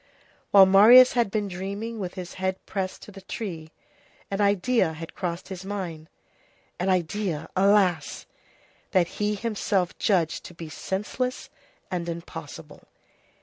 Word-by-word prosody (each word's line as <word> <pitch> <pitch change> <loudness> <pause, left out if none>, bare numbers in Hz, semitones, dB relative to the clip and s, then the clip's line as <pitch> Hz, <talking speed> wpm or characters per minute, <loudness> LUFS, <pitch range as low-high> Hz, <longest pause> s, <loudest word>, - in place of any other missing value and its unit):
While 195 -1 +8
Marius 225 +7 +8
had 240 -4 +2
been 210 0 -1
dreaming 200 +5 -5
with 185 -2 -5
his 180 -2 -7
head 190 0 0
pressed 190 -2 -4
to - - -11
the 195 -1 -12
tree, 185 -5 -6 0.6
an 195 +1 -1
idea 200 -2 +2
had 165 +1 -9
crossed 175 0 -4
his 190 -1 -7
mind; 180 -6 -6 0.7
an 180 +2 0
idea, 180 -2 -1
alas! 190 -2 +2 0.7
that 180 -3 +4
he 210 0 +1
himself 205 -4 -1
judged 175 -7 +1
to 175 - -11
be 165 -1 -8
senseless 210 +10 -4 0.4
and 175 -2 -3
impossible. 165 -2 -9
190 Hz, 135 wpm, -25 LUFS, 170-205 Hz, 0.7 s, While